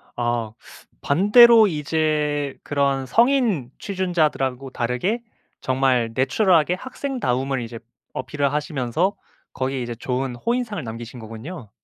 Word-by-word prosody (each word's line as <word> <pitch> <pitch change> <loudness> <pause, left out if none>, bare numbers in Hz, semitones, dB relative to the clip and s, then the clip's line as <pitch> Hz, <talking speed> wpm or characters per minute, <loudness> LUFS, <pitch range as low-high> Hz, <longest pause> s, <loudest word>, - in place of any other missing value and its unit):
아. 120 -2 -1 0.5
반대로 215 - +7
이제 150 -2 -1
그런 140 -2 0
성인 230 - +2
취준자들하고 155 -9 -1
다르게 125 - -1 0.4
정말 130 -3 +1
내추럴하게 165 +5 +3
학생다움을 140 - -2
이제 115 0 -7 0.3
어필을 140 +2 -2
하시면서 150 - -1 0.4
거기에 130 0 -2
이제 120 0 -4
좋은 125 +1 -3
호인상을 230 - -2
남기신 115 +2 -8
거군요. 115 - -9
140 Hz, 290 characters per minute, -22 LUFS, 125-185 Hz, 0.5 s, 반대로